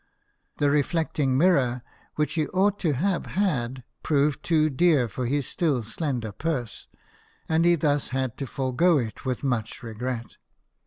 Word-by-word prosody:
The 145 Hz, -1 st, +2 dB
reflecting 145 Hz, -2 st, +1 dB
mirror 130 Hz, -8 st, +3 dB, 0.3 s
which 150 Hz, 0 st, 0 dB
he 155 Hz, -2 st, 0 dB
ought 200 Hz, +2 st, +1 dB
to 160 Hz, -5 st, +1 dB
have 180 Hz, +7 st, -1 dB
had 130 Hz, -10 st, 0 dB, 0.2 s
proved 145 Hz, -1 st, +1 dB
too 155 Hz, -2 st, +2 dB
dear 145 Hz, -3 st, +3 dB
for 120 Hz, +3 st, -4 dB
his 140 Hz, +1 st, 0 dB
still 145 Hz, -9 st, 0 dB
slender 120 Hz, -1 st, -3 dB
purse, 125 Hz, -1 st, -3 dB, 0.6 s
and 160 Hz, +1 st, +2 dB
he 175 Hz, 0 st, +5 dB
thus 145 Hz, -2 st, +1 dB
had 130 Hz, -3 st, -2 dB
to 135 Hz, -, -4 dB
forego 140 Hz, +7 st, +2 dB
it 115 Hz, -2 st, -4 dB
with 130 Hz, 0 st, -2 dB
much 120 Hz, -3 st, -2 dB
regret. 120 Hz, +1 st, -5 dB
140 Hz, 150 wpm, -25 LUFS, 125-160 Hz, 0.6 s, he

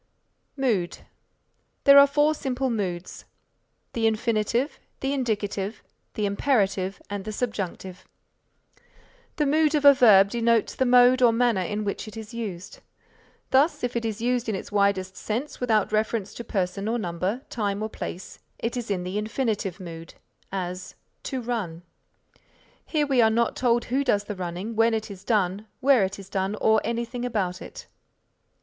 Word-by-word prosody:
MOOD 220 Hz, -10 st, 0 dB, 0.9 s
There 280 Hz, 0 st, +9 dB
are 280 Hz, -, +8 dB
four 295 Hz, +2 st, +3 dB
simple 265 Hz, -3 st, -2 dB
moods, 185 Hz, -5 st, -4 dB, 0.7 s
the 225 Hz, -1 st, +1 dB
Infinitive, 230 Hz, +4 st, 0 dB, 0.2 s
the 270 Hz, +1 st, -1 dB
Indicative, 210 Hz, -5 st, -2 dB, 0.3 s
the 210 Hz, -, 0 dB
Imperative 200 Hz, -3 st, 0 dB
and 205 Hz, -1 st, -5 dB
the 215 Hz, -, -5 dB
Subjunctive. 195 Hz, -5 st, -4 dB, 1.3 s
The 300 Hz, -, +1 dB
Mood 305 Hz, +2 st, +3 dB
of 295 Hz, -1 st, +1 dB
a 285 Hz, -, +10 dB
verb 200 Hz, -6 st, +6 dB
denotes 230 Hz, -1 st, +2 dB
the 260 Hz, -, 0 dB
mode 250 Hz, +1 st, +6 dB
or 240 Hz, -2 st, +6 dB
manner 230 Hz, -4 st, +2 dB
in 210 Hz, +4 st, -2 dB
which 205 Hz, +1 st, -4 dB
it 215 Hz, -, -9 dB
is 220 Hz, +1 st, -8 dB
used. 200 Hz, -5 st, -6 dB, 0.7 s
Thus 275 Hz, +4 st, +3 dB
if 245 Hz, 0 st, -2 dB
it 235 Hz, -, -1 dB
is 225 Hz, 0 st, -3 dB
used 245 Hz, -1 st, 0 dB
in 215 Hz, -, 0 dB
its 190 Hz, -, -7 dB
widest 200 Hz, -2 st, +1 dB
sense 240 Hz, +7 st, -4 dB
without 220 Hz, -5 st, +1 dB
reference 215 Hz, -1 st, -1 dB
to 235 Hz, -, -7 dB
person 195 Hz, -1 st, -2 dB
or 230 Hz, +2 st, 0 dB
number, 185 Hz, +5 st, -3 dB
time 205 Hz, -2 st, -2 dB
or -, -, -1 dB
place, 185 Hz, -3 st, -7 dB, 0.2 s
it 230 Hz, +2 st, -3 dB
is 240 Hz, -3 st, -4 dB
in 185 Hz, -3 st, -1 dB
the 185 Hz, +3 st, -2 dB
Infinitive 215 Hz, -4 st, -2 dB
Mood; 165 Hz, -2 st, -9 dB, 0.4 s
as 185 Hz, -1 st, -5 dB, 0.3 s
"To 260 Hz, -2 st, -3 dB
run." 205 Hz, -9 st, -4 dB, 1.0 s
Here 300 Hz, -2 st, +1 dB
we 270 Hz, -4 st, +3 dB
are 220 Hz, -, +5 dB
not 230 Hz, +1 st, +1 dB
told 240 Hz, -1 st, +1 dB
who 265 Hz, +3 st, 0 dB
does 205 Hz, -6 st, +2 dB
the 210 Hz, -, -5 dB
running, 185 Hz, +5 st, -5 dB
when 225 Hz, +1 st, +3 dB
it 220 Hz, -1 st, -4 dB
is 190 Hz, -1 st, -10 dB
done, 205 Hz, -1 st, 0 dB
where 265 Hz, -5 st, +4 dB
it 190 Hz, +1 st, -2 dB
is 195 Hz, -1 st, -11 dB
done 195 Hz, +1 st, -2 dB
or 220 Hz, 0 st, +3 dB
anything 235 Hz, +1 st, -3 dB
about 200 Hz, -7 st, -2 dB
it. -, -, -10 dB
220 Hz, 165 wpm, -25 LUFS, 195-245 Hz, 1.3 s, a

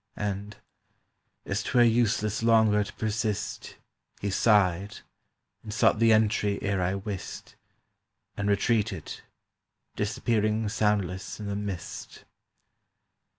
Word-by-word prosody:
And, 105 Hz, 0 st, -4 dB, 0.9 s
as -, -, -1 dB
'twere 120 Hz, -, +3 dB
useless 110 Hz, -2 st, +2 dB
longer 110 Hz, -2 st, +4 dB
To 100 Hz, -, -8 dB
persist, 110 Hz, -1 st, -3 dB, 0.4 s
He 100 Hz, -, -2 dB
sighed, 100 Hz, -2 st, +2 dB, 0.6 s
and 110 Hz, -, -8 dB
sought 105 Hz, -, +3 dB
the 115 Hz, 0 st, +5 dB
entry 105 Hz, -2 st, +2 dB
Ere 100 Hz, -2 st, 0 dB
I 90 Hz, +2 st, 0 dB
wist, 100 Hz, -1 st, -6 dB, 0.8 s
And 105 Hz, 0 st, -1 dB
retreated, 105 Hz, +1 st, 0 dB, 0.7 s
disappearing 110 Hz, -1 st, 0 dB
soundless 100 Hz, -3 st, -1 dB
in 105 Hz, -, -6 dB
the 100 Hz, 0 st, -3 dB
mist. 100 Hz, -3 st, -6 dB
105 Hz, 105 wpm, -27 LUFS, 100-110 Hz, 0.9 s, the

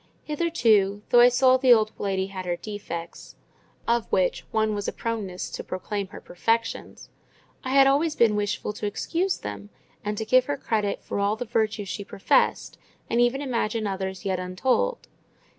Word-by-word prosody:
Hitherto, 225 Hz, -, +2 dB
though 240 Hz, -, +6 dB
I 245 Hz, +1 st, +8 dB
saw 255 Hz, +1 st, +4 dB
the 260 Hz, -1 st, +4 dB
old 215 Hz, -1 st, +1 dB
lady 190 Hz, -1 st, -1 dB
had 190 Hz, -2 st, -7 dB
her 175 Hz, -, 0 dB
defects 170 Hz, -4 st, -7 dB, 0.5 s
(of 235 Hz, -1 st, 0 dB
which 185 Hz, -1 st, +1 dB
one 220 Hz, -1 st, +1 dB
was 205 Hz, -1 st, -3 dB
a -, -, 0 dB
proneness 210 Hz, -6 st, -4 dB
to -, -, -5 dB
proclaim 200 Hz, +2 st, -4 dB
her -, -, -10 dB
perfections), 225 Hz, +5 st, -2 dB, 0.5 s
I 260 Hz, -, -4 dB
had 275 Hz, -1 st, +7 dB
always 295 Hz, +3 st, +2 dB
been 225 Hz, -3 st, +4 dB
wishful 210 Hz, 0 st, -2 dB
to 210 Hz, 0 st, -4 dB
excuse 350 Hz, -, -1 dB
them, 100 Hz, -1 st, -7 dB, 0.3 s
and 210 Hz, 0 st, -3 dB
to 220 Hz, -, -3 dB
give 255 Hz, +3 st, +4 dB
her 285 Hz, +1 st, -2 dB
credit 210 Hz, -6 st, -1 dB
for -, -, -4 dB
all 200 Hz, +1 st, +1 dB
the 245 Hz, -, -5 dB
virtues 220 Hz, -2 st, -1 dB
she 200 Hz, -, -4 dB
professed, 195 Hz, -, +1 dB, 0.3 s
and 235 Hz, +1 st, +3 dB
even 250 Hz, +4 st, +2 dB
imagine 230 Hz, -4 st, -1 dB
others 190 Hz, -1 st, -4 dB
yet 190 Hz, -2 st, 0 dB
untold. 250 Hz, -, -1 dB
215 Hz, 175 wpm, -25 LUFS, 195-245 Hz, 0.5 s, I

